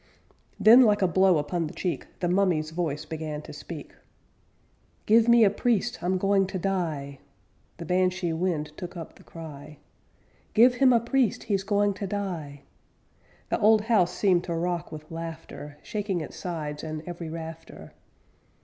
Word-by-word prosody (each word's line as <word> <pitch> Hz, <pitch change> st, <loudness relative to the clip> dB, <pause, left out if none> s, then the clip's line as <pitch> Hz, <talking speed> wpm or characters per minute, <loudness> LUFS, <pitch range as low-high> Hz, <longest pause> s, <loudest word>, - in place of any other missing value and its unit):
Then, 220 Hz, +5 st, +8 dB
like 210 Hz, -5 st, +4 dB
a -, -, +4 dB
blow 185 Hz, 0 st, +4 dB
upon 155 Hz, +3 st, -1 dB
the -, -, -10 dB
cheek, 180 Hz, -3 st, -3 dB
The 175 Hz, -, +1 dB
mummy's 175 Hz, -4 st, +1 dB
voice 160 Hz, -3 st, -3 dB
began 155 Hz, -2 st, -5 dB
to -, -, -10 dB
speak: -, -, -9 dB, 1.1 s
'Give 225 Hz, +2 st, +5 dB
me 235 Hz, -1 st, +7 dB
a 200 Hz, -, +5 dB
priest! 240 Hz, +1 st, 0 dB
I'm 180 Hz, +2 st, 0 dB
going 195 Hz, 0 st, +2 dB
to 190 Hz, -, -4 dB
die!' 165 Hz, -7 st, -2 dB, 0.6 s
The 170 Hz, -, -7 dB
Banshee 180 Hz, 0 st, +1 dB
wind 160 Hz, -3 st, -1 dB
took 180 Hz, 0 st, -7 dB
up 165 Hz, -, -8 dB
the -, -, -19 dB
cry: 150 Hz, -2 st, -10 dB, 0.8 s
'Give 240 Hz, +3 st, +7 dB
him 255 Hz, +1 st, +4 dB
a 235 Hz, -, +5 dB
priest, 245 Hz, 0 st, 0 dB
he's 200 Hz, -4 st, 0 dB
going 205 Hz, 0 st, +1 dB
to 200 Hz, 0 st, -5 dB
die!' 170 Hz, -8 st, -5 dB, 0.9 s
The -, -, 0 dB
old 215 Hz, 0 st, +5 dB
house 210 Hz, -5 st, +2 dB
seemed 185 Hz, -4 st, +2 dB
to 170 Hz, -, -3 dB
rock 175 Hz, -1 st, -2 dB
with 155 Hz, 0 st, -10 dB
laughter, 165 Hz, -3 st, -8 dB
Shaking 205 Hz, -4 st, -2 dB
its 155 Hz, -, -8 dB
sides 150 Hz, -4 st, -5 dB
and 155 Hz, 0 st, -5 dB
every 175 Hz, -2 st, -6 dB
rafter. 165 Hz, 0 st, -9 dB
180 Hz, 160 wpm, -26 LUFS, 160-205 Hz, 1.1 s, Then